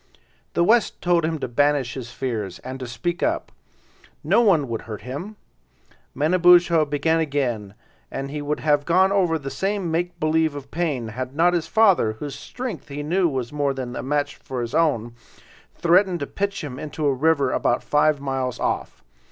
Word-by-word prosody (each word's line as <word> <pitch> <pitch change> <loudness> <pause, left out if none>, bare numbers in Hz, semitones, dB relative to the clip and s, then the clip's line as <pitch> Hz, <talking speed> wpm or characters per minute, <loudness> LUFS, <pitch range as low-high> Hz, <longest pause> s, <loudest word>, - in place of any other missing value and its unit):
The 170 - +3
West 225 +4 +3
told 175 -2 +2
him 160 0 -1
to 145 - -4
banish 140 0 +1
his 125 -3 -6
fears, 110 -9 -4
and 130 +1 -6
to 130 - -5
speak 175 +9 -3
up; 325 +1 -1 0.7
no - - +4
one 175 - +3
would 115 -2 -3
hurt 110 -2 -8
him. 145 - -6 0.8
Manabozho 175 +1 +5
began 150 +3 +1
again, 125 -10 -2 0.3
and 135 0 -5
he 150 0 -4
would 150 +1 -2
have 145 -1 +2
gone 185 +3 +4
over 180 -5 +2
the 135 -3 -6
same 195 -3 -2
make 175 +2 -2
believe 155 -1 +1
of 140 -1 -9
pain, 145 -9 -2
had 130 +4 -5
not 175 +3 +4
his 165 -2 -1
father, 195 - +4
whose 140 +6 -6
strength 235 - -6
he 145 0 -5
knew 175 +3 +2
was 130 -2 -4
more 145 -2 0
than 125 -2 -5
a - - -3
match 145 +2 -1
for 130 -2 -5
his 120 +2 -5
own, 145 -8 +1 0.6
threatened 180 +1 +3
to - - -1
pitch 200 +4 -3
him 135 -3 -6
into 155 0 -4
a 140 - +3
river 140 -1 +2
about 120 - +1
five 150 0 +2
miles 135 -2 -3
off. - - -3
150 Hz, 185 wpm, -23 LUFS, 130-175 Hz, 0.8 s, Manabozho